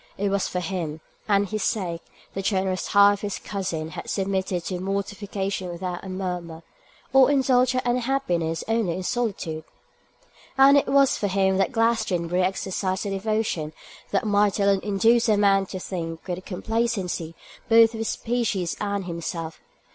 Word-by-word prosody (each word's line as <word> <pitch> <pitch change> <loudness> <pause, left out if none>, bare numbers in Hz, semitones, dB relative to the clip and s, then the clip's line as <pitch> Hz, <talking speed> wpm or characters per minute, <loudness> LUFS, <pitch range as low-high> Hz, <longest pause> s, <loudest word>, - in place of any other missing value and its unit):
It 200 +1 0
was 200 0 0
for 180 - -3
him, 165 -3 -3 0.3
and 200 0 +3
his 215 +1 -3
sake, 175 -5 -1 0.3
the 195 - -3
generous 190 -1 0
heart 200 0 +6
of 205 - -6
his 205 -1 -3
cousin 170 -6 -4
had - - -7
submitted 190 -3 -1
to 180 -2 -3
mortification 195 0 -3
without 175 0 -5
a 190 - -7
murmur, 180 -3 -5 0.5
or 270 0 +7
indulged 260 -2 +3
her 255 - 0
unhappiness 240 -10 0
only 225 -6 +1
in 185 - -4
solitude; 190 -9 -2 0.9
and 270 +1 +7
it 285 - +3
was 275 0 +4
for 205 - 0
him 190 0 +2
that 195 +6 +1
Glastonbury 215 -7 +1
exercised 190 +1 -1
a 200 - -2
devotion 195 -6 -1 0.4
that 200 - 0
might 205 -1 +2
alone 200 -1 +3
induce 225 +3 +3
a 210 - +4
man 195 -1 +3
to 185 - -6
think 165 -3 -5
with 180 0 -4
complacency 195 -5 -2 0.3
both 225 0 +6
of 225 - -6
his 225 - -1
species 225 -7 -1
and 200 -2 -2
himself. 165 -1 -5
195 Hz, 160 wpm, -24 LUFS, 180-220 Hz, 0.9 s, or